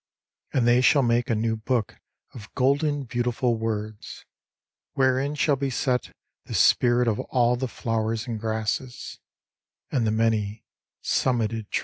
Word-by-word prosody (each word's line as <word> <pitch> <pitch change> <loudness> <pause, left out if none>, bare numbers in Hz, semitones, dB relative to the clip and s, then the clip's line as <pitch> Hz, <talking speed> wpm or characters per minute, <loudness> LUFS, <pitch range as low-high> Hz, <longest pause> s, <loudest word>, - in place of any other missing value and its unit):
And 120 -3 +1
they 120 +1 +5
shall 140 +2 +4
make 120 +2 +1
a 115 - +2
new 110 +1 0
Book 110 0 -2 0.4
of 110 -3 -11
golden 140 +2 +1
beauti 120 0 -2
ful 120 -1 +1
words, 110 -1 -5 0.7
Wherein 135 +2 +1
shall 145 0 +2
be 135 +1 -1
set 125 0 -1 0.3
the - - -6
spirit 120 0 +4
of 110 -2 0
all 120 -1 +1
the 130 +2 -3
flowers 115 -1 -2
and 115 -3 -4
grasses, 110 +3 -3 0.7
And 120 -5 +1
the - - +1
many 110 -1 0 0.4
summited 115 -4 0
trees. - - 0
120 Hz, 145 wpm, -25 LUFS, 110-130 Hz, 0.7 s, they